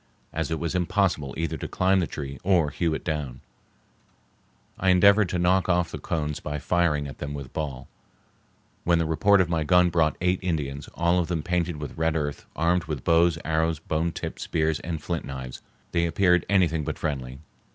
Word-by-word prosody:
As 80 +1 -2
it 80 -1 -2
was 85 0 -2
impossible 90 -7 0
either 80 -1 -2
to - - -5
climb 95 +1 +2
the 85 - 0
tree 70 -3 -6
or 90 -6 +3
hew 80 +1 0
it - - -6
down, 75 -6 -3 1.4
I 95 - +2
endeavored 100 +2 +5
to 90 - -1
knock 90 +2 +2
off 90 -1 +2
the - - -6
cones 75 -2 -2
by 75 0 -4
firing 75 -2 +1
at 65 - -10
them 70 0 -4
with 70 -3 -8
ball, 70 -5 -4 1.0
when 85 0 +3
the 85 - +1
report 95 +5 +4
of 90 - +1
my 80 -2 0
gun 90 +2 +4
brought 80 -2 +2
eight 90 +1 +1
Indians, 75 -6 -3
all 85 +1 +2
of 85 - 0
them 85 -4 -2
painted 85 -1 -1
with 75 +1 -7
red 80 0 +1
earth, 75 -2 -3
armed 85 +1 +1
with 75 -5 -4
bows, 85 0 +4
arrows, 80 0 +1
bone 80 +2 -1
tipped - - -6
spears, 80 -1 0
and 80 -3 -5
flint 85 0 -2
knives. 65 -2 -7 0.3
They 85 -1 +1
appeared 90 +1 +2
anything 85 -5 +2
but - - -4
friendly. 65 -4 -3
80 Hz, 195 wpm, -26 LUFS, 75-90 Hz, 1.4 s, endeavored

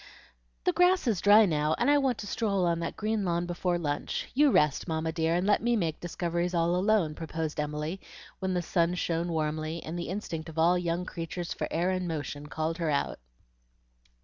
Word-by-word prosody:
"The 360 - +2
grass 360 0 +4
is 215 -8 +1
dry 210 +2 +7
now, 155 -3 +1
and - - +1
I 290 0 +5
want 265 -4 +1
to - - -6
stroll 200 -2 0
on 170 -1 +1
that 170 - -3
green 215 0 -1
lawn 175 -1 0
before 175 0 -1
lunch. 145 -4 -3
You 290 +2 +5
rest, 150 - +2
Mamma 160 -1 -1
dear, 165 0 0
and 180 +2 +1
let 205 - +3
me 240 +1 +2
make 165 -7 -1
discoveries 175 0 -2
all 170 +1 +2
alone," 185 -4 +2
proposed 160 -1 -4
Emily, 150 +5 -3 0.4
when 190 -1 -1
the 175 - 0
sun 170 +1 +1
shone 170 -1 -1
warmly, 155 +1 -2
and 165 +2 -5
the 170 - -4
instinct 170 -5 -4
of 160 - -11
all 170 +3 +4
young 175 0 -1
creatures 170 0 -5
for - - -3
air 175 +3 0
and 185 -1 -1
motion 150 -2 -4
called 160 +3 -3
her 165 -2 0
out. 140 -1 -1
170 Hz, 200 wpm, -29 LUFS, 160-190 Hz, 0.4 s, dry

